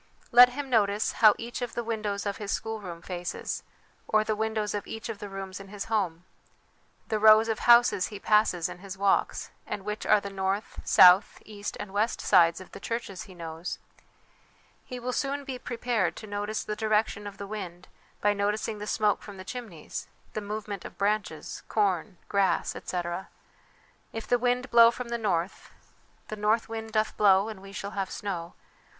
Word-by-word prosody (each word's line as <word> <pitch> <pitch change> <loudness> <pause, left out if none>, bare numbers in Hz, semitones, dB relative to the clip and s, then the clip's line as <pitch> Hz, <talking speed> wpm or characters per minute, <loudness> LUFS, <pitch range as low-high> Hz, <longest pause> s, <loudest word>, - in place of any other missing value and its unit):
Let 245 +1 +9
him 285 +1 -4
notice 210 -4 +2
how 215 -2 +6
each 235 +2 -6
of 245 - -4
the 240 - -2
windows 215 -3 -2
of 200 -1 -2
his 205 -2 -4
schoolroom 200 -7 -4
faces, 175 -1 -4 0.5
or 215 0 +3
the 215 0 -1
windows 220 -1 -1
of 205 - -4
each 225 +2 -6
of 220 -3 -5
the 205 - -7
rooms 195 -1 -6
in 195 - -10
his 200 0 -6
home; 180 -5 0 0.8
the 215 -2 0
rows 215 +1 +7
of 220 -1 -1
houses 235 -6 +6
he 205 - -8
passes 210 -5 +3
in - - -9
his 190 0 -8
walks, 200 0 +1 0.2
and 195 - -5
which 210 0 -4
are - - +6
the 200 0 -7
north, 195 +2 -2
south, 180 +2 +6
east 205 -1 -6
and 205 -2 -7
west 215 +3 0
sides 170 -3 +4
of 185 - -12
the - - -9
churches 230 -5 -4
he 185 - -12
knows. 165 0 -6 1.1
He 250 - -7
will 250 +1 -3
soon 280 +1 -1
be 265 -2 -6
prepared 230 -9 -1
to 220 - -8
notice 205 +1 -3
the 210 - -4
direction 215 -1 0
of 200 -1 -9
the 200 - -6
wind 185 -4 -7 0.3
by 205 0 +3
noticing 210 +1 -1
the 210 - -6
smoke 210 -2 +1
from 205 -2 -10
the 185 - -9
chimneys, 215 -9 -7 0.3
the 215 - -3
movement 205 -2 -5
of - - -10
branches, 200 -6 -2
corn, 195 -2 0
grass, 200 -2 +1
etc. 175 +1 -4 0.8
If 225 - -5
the 245 - +3
wind 250 +1 0
blow 230 -1 +8
from 240 0 -5
the 235 0 -2
north 185 -4 -2 0.6
The 215 - -4
north 215 +2 +1
wind 225 0 -6
doth 215 0 0
blow 200 0 +5
and 210 -3 -8
we 195 0 -11
shall 200 0 -5
have 195 -2 -3
snow.' 175 -4 -5
210 Hz, 185 wpm, -28 LUFS, 195-220 Hz, 1.1 s, Let